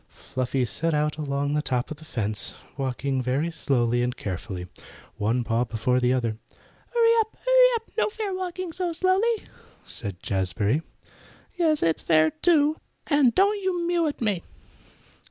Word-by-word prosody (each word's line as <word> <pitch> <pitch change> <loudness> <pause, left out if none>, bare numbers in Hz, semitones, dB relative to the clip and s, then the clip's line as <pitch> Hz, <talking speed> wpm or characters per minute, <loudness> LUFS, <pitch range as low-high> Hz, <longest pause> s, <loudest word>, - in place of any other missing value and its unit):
Fluffy 130 0 -2
set 160 +7 -1
out 150 +1 0
along 145 -1 -1
the 150 - +1
top 125 -3 -2
of 155 - -5
the 155 - -14
fence, 110 -7 -3 0.2
walking 135 0 -1
very 135 +7 0
slowly 120 -6 +1
and 125 +1 -1
carefully, 90 -1 -5 0.5
one 115 +4 +1
paw 115 +1 +1
before 120 +2 0
the 125 0 +2
other. 115 -4 0 0.5
"Hurry 465 -1 +4
up! 440 0 -1
hurry - - +7
up! 455 -1 -5
No - - +2
fair 420 -2 -4
walking 370 -1 -4
so 360 -1 -2
slowly," 390 +6 +2 0.4
said 100 -6 -7
Jazbury. 100 - 0 0.7
"Yes, 320 -4 +2
it 165 -1 +2
is - - -6
fair, 155 -1 +4
too. 310 - +3 0.3
And 285 -6 +3
don't 405 +2 +3
you 360 -3 -1
mew 340 -1 +2
at 290 - -4
me." 205 -6 0
150 Hz, 160 wpm, -25 LUFS, -, 0.7 s, hurry